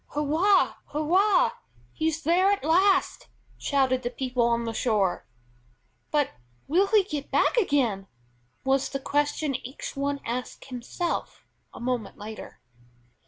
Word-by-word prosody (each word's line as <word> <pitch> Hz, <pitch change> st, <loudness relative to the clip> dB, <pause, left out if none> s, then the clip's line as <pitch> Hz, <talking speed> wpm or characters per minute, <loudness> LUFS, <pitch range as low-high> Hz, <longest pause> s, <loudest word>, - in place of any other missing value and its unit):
"Hurrah! 320 Hz, +7 st, +3 dB
Hurrah! 360 Hz, -, +3 dB, 0.4 s
he's 320 Hz, 0 st, -1 dB
there 360 Hz, +5 st, +4 dB
at 405 Hz, -, -1 dB
last!" 370 Hz, +4 st, +2 dB, 0.3 s
shouted 265 Hz, -3 st, +1 dB
the 240 Hz, -, -2 dB
people 255 Hz, -1 st, -2 dB
on 235 Hz, 0 st, +1 dB
the 230 Hz, -, -3 dB
shore. 210 Hz, -6 st, 0 dB, 0.8 s
"But 295 Hz, -2 st, +1 dB, 0.4 s
will 365 Hz, +7 st, +3 dB
he 420 Hz, -1 st, +4 dB
get 300 Hz, -7 st, -5 dB
back -, -, +2 dB
again?" 255 Hz, -, +1 dB, 0.6 s
was 270 Hz, 0 st, +1 dB
the 275 Hz, -, -3 dB
question 290 Hz, +1 st, 0 dB
each 260 Hz, +2 st, -8 dB
one 280 Hz, +1 st, -1 dB
asked 250 Hz, +2 st, -5 dB
himself 265 Hz, +7 st, -4 dB, 0.3 s
a -, -, -11 dB
moment 240 Hz, -4 st, -3 dB
later. 215 Hz, +1 st, -9 dB
285 Hz, 125 wpm, -26 LUFS, 250-335 Hz, 0.8 s, there